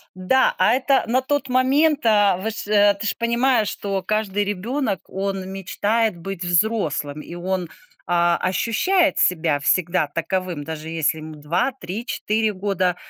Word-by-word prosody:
Да! 185 +9 +2
А 220 - +4
это 265 +1 +2
на 250 +3 +2
тот 280 0 -1
момент, 275 +3 +2
а, 205 -4 +4
вы 200 +4 -3
ж 220 - -7
э, 205 -1 +5
ты 200 +2 -7
ж - - -1
понимаешь, 235 -1 +2
что 195 -1 -3
каждый 205 +1 -1
ребенок, 205 - -2
он 195 -1 -3
мечтает 205 +2 -1
быть 185 +1 -7
взрослым. 175 -6 0
И 170 - -9
он, 180 0 -2 0.4
а, 175 0 +2
ощущает 285 - +1
себя 160 -4 +2
всегда 170 +2 +1
таковым, 170 +1 -3
даже 160 +1 -7
если 160 -1 0
ему 155 0 -9
2, 165 - -1
3, 195 +7 -5
4 220 -2 -1
года. 185 -2 0
195 Hz, 155 wpm, -22 LUFS, 175-230 Hz, 0.4 s, э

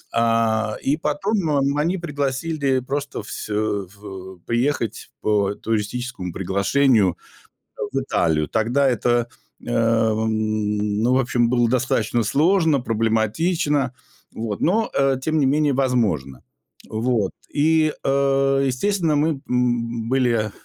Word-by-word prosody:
Э, 115 -1 +2
и 145 +3 +1
потом, 165 +4 -1
м, 140 0 +1
они 170 +6 +1
пригласили 140 -2 -1
просто 140 -3 -4
вс 110 - -7
э, - - -2
в 100 -3 -4
приехать 120 -1 -1
по 100 -2 +1
туристическому 110 -2 -3
приглашению 100 +2 +2 0.8
в 135 - +1
Италию. 80 - 0
Тогда 120 +5 +1
это, 120 -1 +1 0.4
эм, 110 -2 0
ну, 125 +2 +3
в 130 - +4
общем, 120 -2 +1
было 120 -2 +2
достаточно 120 -2 +1
сложно, 160 - +3
проблематично, 125 - 0 0.4
вот, 110 -2 -4
но, 220 +6 +2
э, 135 -1 +2
тем 155 +3 0
не 140 - +3
менее, 145 0 +2
возможно. 110 - 0 0.5
Вот 110 -3 0 0.2
и, 155 +1 +3
э, 135 0 +2
естественно, 165 +4 0
мы, 145 -1 0
м, 120 -2 0
были, 120 -5 +1
125 Hz, 115 wpm, -22 LUFS, 110-140 Hz, 0.8 s, в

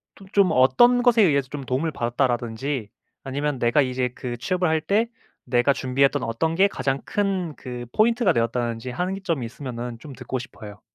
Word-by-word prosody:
또 195 - -15
좀 200 -3 +5
어떤 240 - +5
것에 240 -3 +5
의해서 140 -6 +2
좀 145 -2 -6
도움을 135 +6 -1
받았다."라든지 120 -1 -1 0.3
아니면 140 0 -2
"내가 120 +5 +3
이제 125 -1 -1
그 120 -2 -5
취업을 180 +6 0
할 160 -1 +1
때 215 +8 +1 0.4
내가 125 +3 +3
준비했던 135 +2 +1
어떤 160 +9 -1
게 195 +3 +5
가장 135 -7 -2
큰 190 -6 -1
그 125 -1 -7
포인트가 225 -4 +3
되었다."든지 115 +1 -1
하는 185 +8 -2
점이 155 -10 -1
있으면은 120 -1 -6
좀 145 0 -10
듣고 130 - -5
싶어요. 105 -4 -11
135 Hz, 375 characters per minute, -24 LUFS, 120-175 Hz, 0.4 s, 좀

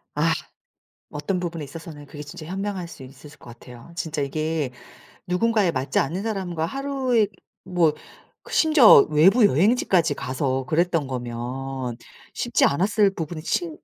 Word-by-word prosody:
아 - - +2 0.8
어떤 190 -2 -3
부분에 170 -3 -4
있어서는 155 0 -10
그게 145 +1 -10
진짜 150 +2 -10
현명할 190 +1 -4
수 150 - -11
있었을 140 +3 -14
것 120 - -12
같아요. 125 +5 -13
진짜 160 -3 -3
이게 155 -1 -2 0.6
누군가에 205 0 +2
맞지 135 - -1
않는 175 +8 -1
사람과 185 -7 -2
하루에 260 -1 0 0.4
뭐 175 -4 +2 0.5
그 - - -13
심지어 295 - +7
외부 190 +10 +5
여행지까지 180 - +2
가서 130 0 -2
그랬던 165 -1 +1
거면 125 +1 -5 0.4
쉽지 - - +1
않았을 195 +6 +2
부분이 160 -1 -5
친 325 - -2
165 Hz, 310 characters per minute, -23 LUFS, 140-195 Hz, 0.8 s, 심지어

